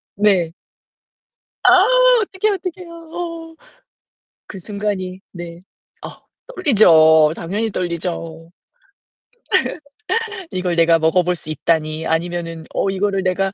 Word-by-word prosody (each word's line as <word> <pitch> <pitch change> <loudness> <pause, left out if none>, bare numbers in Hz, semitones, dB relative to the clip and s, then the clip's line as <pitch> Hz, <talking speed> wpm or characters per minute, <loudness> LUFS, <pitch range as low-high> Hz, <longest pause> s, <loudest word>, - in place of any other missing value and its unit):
네. 195 -5 +2 1.1
아. 370 - +6 0.5
어떡해, 405 +1 -1
어떡해요. 365 -1 -7 0.2
어. 335 -2 -6 0.9
그 195 - -9
순간이 190 -1 -4
네. 175 -1 -9 0.4
아. - - -9 0.4
떨리죠, 160 - +5
당연히 210 +7 -3
떨리죠. 170 -2 -5 2.0
이걸 180 -2 -2
내가 165 0 +4
먹어볼 175 +2 +2
수 155 - -9
있다니. 155 +1 -1
아니면은 165 0 -3
어 - - 0
이거를 195 0 -1
내가 190 +1 0
180 Hz, 205 characters per minute, -19 LUFS, 165-210 Hz, 2.0 s, 아